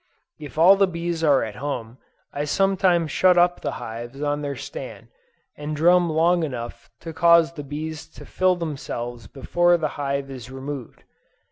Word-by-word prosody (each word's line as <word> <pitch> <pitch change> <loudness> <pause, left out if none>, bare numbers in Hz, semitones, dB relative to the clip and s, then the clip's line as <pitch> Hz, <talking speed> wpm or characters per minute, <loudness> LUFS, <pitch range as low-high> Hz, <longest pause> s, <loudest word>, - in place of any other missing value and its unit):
If 150 0 -10
all 180 +5 +7
the 195 0 +4
bees 170 -1 -3
are 145 -4 +4
at 105 -2 -6
home, 125 -3 -5 0.3
I 145 +1 -2
sometimes 180 -1 +2
shut 185 -1 +4
up 175 0 +3
the - - -3
hives 120 +4 -7
on 145 0 -1
their 140 -1 -3
stand, - - -8 0.5
and 150 +1 -5
drum 175 +3 +4
long 170 +3 +2
enough 125 -6 -6
to 165 -1 -7
cause 170 0 +5
the 150 -3 -7
bees 155 +2 -6
to - - -10
fill 185 0 +1
themselves 120 -8 -5
before 175 +7 +2
the 155 -3 -1
hive 140 0 -2
is 125 -2 -9
removed. 135 -1 -7
155 Hz, 165 wpm, -23 LUFS, 135-175 Hz, 0.5 s, all